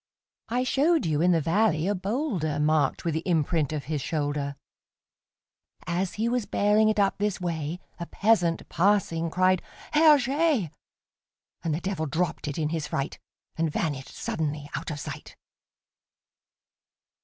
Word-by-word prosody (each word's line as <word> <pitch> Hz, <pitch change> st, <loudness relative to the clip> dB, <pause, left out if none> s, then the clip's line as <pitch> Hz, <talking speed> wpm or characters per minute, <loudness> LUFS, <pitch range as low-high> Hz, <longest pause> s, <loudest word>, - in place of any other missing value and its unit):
I 245 Hz, +2 st, +1 dB
showed 305 Hz, +5 st, +2 dB
you 155 Hz, -2 st, +1 dB
in 180 Hz, +1 st, +4 dB
the 165 Hz, -, +3 dB
valley 170 Hz, 0 st, +2 dB
a 205 Hz, -, +2 dB
boulderMarked 170 Hz, -, 0 dB
with 165 Hz, -, 0 dB
the 160 Hz, -, 0 dB
imprint 160 Hz, -3 st, 0 dB
of 150 Hz, -2 st, -3 dB
his 150 Hz, -2 st, -3 dB
shoulder; 145 Hz, -1 st, -2 dB, 1.3 s
As 180 Hz, +1 st, -1 dB
he 220 Hz, +2 st, 0 dB
was 240 Hz, -3 st, 0 dB
bearing 210 Hz, +1 st, +3 dB
it 215 Hz, -, 0 dB
up 200 Hz, 0 st, +2 dB
this 205 Hz, -1 st, 0 dB
way,A 170 Hz, 0 st, -5 dB
peasant, 185 Hz, -6 st, +2 dB
passing, 170 Hz, -3 st, +1 dB
cried, 185 Hz, +1 st, +2 dB, 0.3 s
"Herr 305 Hz, -1 st, +7 dB
Jé!"And 250 Hz, -, -3 dB
the 165 Hz, -, -4 dB
Devil 185 Hz, -5 st, -2 dB
dropped 165 Hz, +2 st, -2 dB
it 145 Hz, -, -4 dB
in 155 Hz, -2 st, 0 dB
his 160 Hz, -2 st, -2 dB
fright, 135 Hz, +1 st, -3 dB, 0.4 s
And 165 Hz, 0 st, 0 dB
vanished 145 Hz, -4 st, -2 dB
suddenly 150 Hz, -2 st, -3 dB
out -, -, -4 dB
of 150 Hz, -2 st, -4 dB
sight! -, -, -8 dB
170 Hz, 140 wpm, -27 LUFS, 155-205 Hz, 1.3 s, Herr